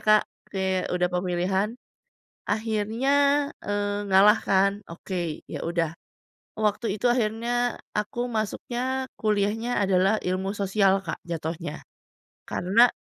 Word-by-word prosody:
Kak, 215 0 +6 0.3
oke 190 -1 -3 0.3
udah 180 0 +2
pemilihan, 180 +2 0 0.8
akhirnya, 220 +3 0 0.5
eee 205 0 -1
ngalah 200 +3 +6
kan, 195 0 +3 0.2
oke 175 +2 -6 0.3
ya - - -5
udah, 170 -2 0 0.7
waktu 215 +2 +1
itu 245 - -3
akhirnya 240 +1 0 0.2
aku 210 +3 -2
masuknya 245 +4 -2
kuliahnya 215 +3 +1
adalah 195 +3 +3
ilmu 185 +2 -1
sosial, 195 -1 +3
Kak - - -4
jatuhnya, 160 -1 -4 0.6
karena, 210 +7 +4
205 Hz, 105 wpm, -26 LUFS, 190-220 Hz, 0.8 s, Kak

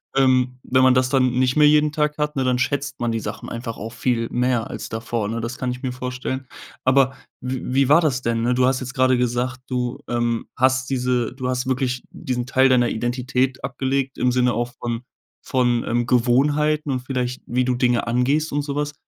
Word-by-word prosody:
Ähm, 130 -1 +2
wenn 130 0 +2
man 130 0 +6
das 130 0 +2
dann 130 -2 +3
nicht 130 0 +2
mehr 150 -1 +6
jeden 150 0 +4
Tag 150 0 0
hat, 150 0 -1
ne, 135 - 0
dann 125 -1 +1
schätzt 140 +2 -2
man 120 -1 0
die 115 - -1
Sachen - - -6
einfach 115 -1 -5
auch 110 +2 -6
viel 120 -2 -1
mehr 125 -2 0
als - - -6
davor, 110 -1 -3
ne? 115 +2 -3
Das 115 +2 -5
kann 125 -2 -2
ich 125 0 -7
mir 130 - -2
vorstellen. 125 +1 -4 0.4
Aber 130 0 +4 0.3
w 130 0 -3
wie 135 0 +3
war 150 +3 +7
das 135 -6 0
denn, 115 -1 0
ne? 120 +1 +2
Du 125 0 +3
hast 130 0 +2
jetzt 125 -1 -6
grade 130 -1 +3
gesagt: 125 +1 -1
„Du, 125 -2 -2
ähm, 120 -1 -1
hast 130 0 +2
diese 125 -3 0
du 130 -1 -4
hast 125 +1 -1
wirklich 130 -1 -1
diesen 125 -1 -3
Teil 130 +1 +3
deiner 120 -2 +4
Identität 125 +2 -1
abgelegt 135 +1 -2
im 125 0 +2
Sinne 125 0 +2
auch 120 +1 -2
von 120 -1 -3 0.4
von, 120 -2 +1
ähm, 120 0 0
Gewohnheiten 145 +5 +2
und 130 -2 -1
vielleicht 125 -1 -3
wie 125 +1 0
du 125 0 +1
Dinge 120 -1 +1
angehst 135 +7 +1
und 145 - +1
so 140 -1 -4
was“. 145 0 -2
125 Hz, 215 wpm, -22 LUFS, 120-130 Hz, 0.4 s, war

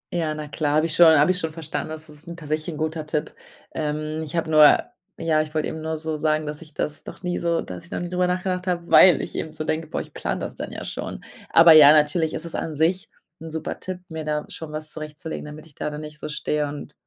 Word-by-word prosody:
Ja, 160 -3 -1
na 150 0 -6
klar, 145 0 -1
habe 155 +1 +3
ich 165 - -2
schon 160 -3 +8
habe 150 +5 +5
ich 180 - -1
schon 160 -2 -3
verstanden. 155 -1 -5
Das 155 0 -6
ist 150 +2 -10
tatsächlich 155 0 -3
'n - - -8
guter 155 0 -3
Tipp. 150 -1 -2 0.4
Ähm, 155 +1 -3
ich 155 +1 -7
habe 165 -1 -1
nur 155 -1 +8 0.4
ja, 160 -2 +2
ich 155 0 -6
wollt 155 - +1
eben 160 - -5
nur 160 0 -3
so 160 0 -3
sagen, 155 0 +1
dass 150 +1 -5
ich 155 -2 -13
das 150 0 -3
noch - - -10
nie 180 0 -1
so 170 -1 0
dass 90 -1 -8
ich - - -15
noch - - -2
nie 175 - -4
drüber 180 0 +1
nachgedacht 180 0 -2
habe, 175 -1 -1
weil 185 -2 +8
ich - - -7
eben 155 - -4
so 155 - -4
denke: 155 +1 -2
„Boah, - - -3
ich - - -12
plane - - -3
das - - -5
dann - - -6
ja - - -7
schon.“ - - -6 0.3
Aber 165 0 +8
ja, 150 -2 +10
natürlich 155 +1 +2
ist 160 - -5
es 170 - -7
an 155 -2 -4
sich 175 +4 +1 0.3
'n 165 - -7
super 160 0 -4
Tipp, 185 -1 -6
mir 160 -1 -5
da 150 0 -2
schon 160 -2 -7
was 155 0 -5
zurechtzulegen, 155 0 -6
damit 150 +1 -10
ich 160 - -16
da 150 - -3
dann 150 0 -6
nicht 150 0 -9
so - - -6
stehe 150 0 -1
und 145 0 -8
155 Hz, 265 wpm, -23 LUFS, 150-165 Hz, 0.4 s, ja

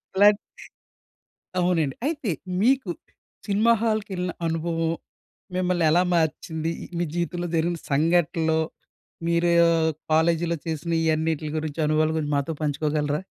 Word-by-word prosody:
ఇలాంటి 205 +1 +6 1.2
అవునండి. 165 -6 +1
అయితే, 285 - -2 0.3
మీకు 260 -4 +3 0.6
సినిమా 210 +3 +3
హాల్‌కెళ్ళిన 200 -5 -1
అనుభవం 165 0 -1 0.7
మిమ్మల్ని 180 -2 +1
ఎలా 175 +3 +4
మార్చింది? 160 0 -1 0.3
మీ 175 - +1
జీవితంలో 175 0 -2
జరిగిన 165 +1 +1
సంఘటనలో, 160 +1 +2 0.7
మీరో 170 +1 +2 0.6
కాలేజీలో 165 +1 +2
చేసిన 165 +1 -3
ఈ - - 0
అన్నిట్లి 155 -1 -1
గురించి, 155 0 -5
అనుభవాలు 155 +1 +2
గురించి 150 -2 -1
మాతో 140 +3 -1
పంచుకోగలరా? 150 0 0
165 Hz, 110 wpm, -25 LUFS, 155-180 Hz, 1.2 s, ఇలాంటి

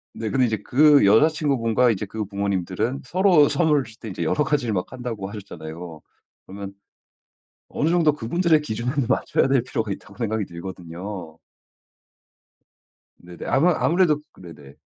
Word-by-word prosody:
네. 110 -1 -4
근데 130 +1 +2
이제 110 -2 -1
그 145 +1 +5
여자친구분과 125 -1 +3
이제 105 -2 -1
그 110 +2 -5
부모님들은 100 +4 -2
"서로 175 -1 +4
선물을 150 -5 +2
주실 110 -1 -15
때 - - -9
인제 90 - -4
여러 150 - +1
가지를 135 -7 0
막 90 -2 -3
한다."고 120 -6 -5
하셨잖아요. 85 -5 -9 0.4
그러면 100 +1 -8 1.0
어느 150 - -1
정도 165 -3 +3
그분들의 155 +5 +1
기준에 120 -3 -3 0.2
맞춰야 - - +1
될 135 -3 +3
필요가 115 -4 -3
있다고 100 - -8
생각이 110 -2 -1
들거든요. 90 0 -8 1.8
네네. 90 -1 -11
아마 165 +7 +3
아무래도 165 -3 +2
그 - - -19
네네. 75 -5 -13
110 Hz, 345 characters per minute, -23 LUFS, 95-145 Hz, 1.8 s, 그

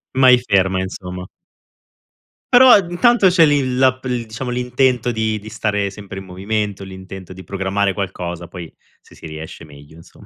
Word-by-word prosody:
Mai 130 -1 +6
ferma, 95 -1 +2
insomma. 90 -1 -7 1.3
Però 255 +1 +8
ad 195 -7 +5
intanto 230 +2 +4
c'è 175 -2 +5
l'i 145 -2 +2
l'app 130 0 +2
il 125 -2 -3
diciamo 115 +3 -5
l'intento 125 0 0
di 110 -1 -1
di 110 +1 -11
stare 105 -2 -1
sempre 95 -1 -9
in 95 - -11
movimento, 100 +2 -3
l'intento 95 -1 -10
di 95 +1 -11
programmare 95 +2 -1
qualcosa, 90 -3 -5
poi 85 -2 -9 0.3
se - - -20
si - - -13
riesce 80 +1 -9
meglio, 75 +1 -16
insomma. 80 - -17
100 Hz, 165 wpm, -19 LUFS, 95-125 Hz, 1.3 s, Però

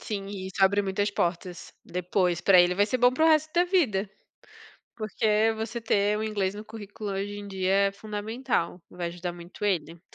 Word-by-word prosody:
Sim, 200 -2 -4
e 195 -2 -6
isso 190 - -9
abre 200 +1 +3
muitas 205 +1 -1
portas 175 -1 -3
depois 180 0 0
pra 185 -3 +6
ele, 175 0 +3
vai 205 +2 +3
ser 255 - -1
bom 245 +1 +5
para 315 +5 +2
o - - +6
resto 310 0 +3
da 350 +1 +3
vida, 255 - +1 0.9
porque 215 0 +1
você 220 +2 -4
ter 210 -2 +1
o 220 - -2
inglês 200 -3 -1
no 210 +1 -8
currículo 215 -1 -7
hoje 200 +1 -3
em 205 - -8
dia 190 -1 -2 0.2
é 195 - -7
fundamental, 210 -2 -3
vai 175 -1 -4
ajudar 175 +1 -5
muito 175 +2 -12
ele. 170 -4 -1
205 Hz, 195 wpm, -27 LUFS, 185-220 Hz, 0.9 s, pra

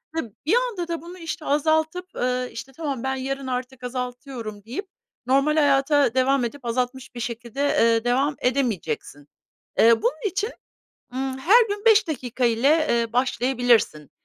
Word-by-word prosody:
hı, 250 -10 -3
bir 345 +10 +3
anda 465 -9 -1
da 335 -2 -3
bunu, 350 +2 -10
işte, 330 -1 -6
azaltıp, 315 +4 +1
eee, 250 0 -1
işte, 255 +3 -8
"Tamam, 280 -5 -4
ben 265 0 -1
yarın 270 0 -4
artık 250 0 -4
azaltıyorum." 245 -4 -6
deyip 300 - -5 0.4
normal 275 +4 +3
hayata 285 -2 +3
devam 260 0 +2
edip 250 +2 -7
azaltmış 250 +2 -3
bir - - -6
şekilde, 235 +2 -5
eee, 230 -3 +3
devam 265 +4 +1
edemeyeceksin. 195 - -2 0.5
Eee, 225 0 +6
bunun 305 - 0
için, 405 +5 -2 0.6
ımm, 265 0 -3
her 435 - +6
gün 410 +2 -4
5 430 -3 +6
dakika 255 -4 -2
ile, 275 +8 +3
eee, 230 -1 +1
başlayabilirsin. 245 - +1
265 Hz, 150 wpm, -24 LUFS, 245-305 Hz, 0.6 s, Eee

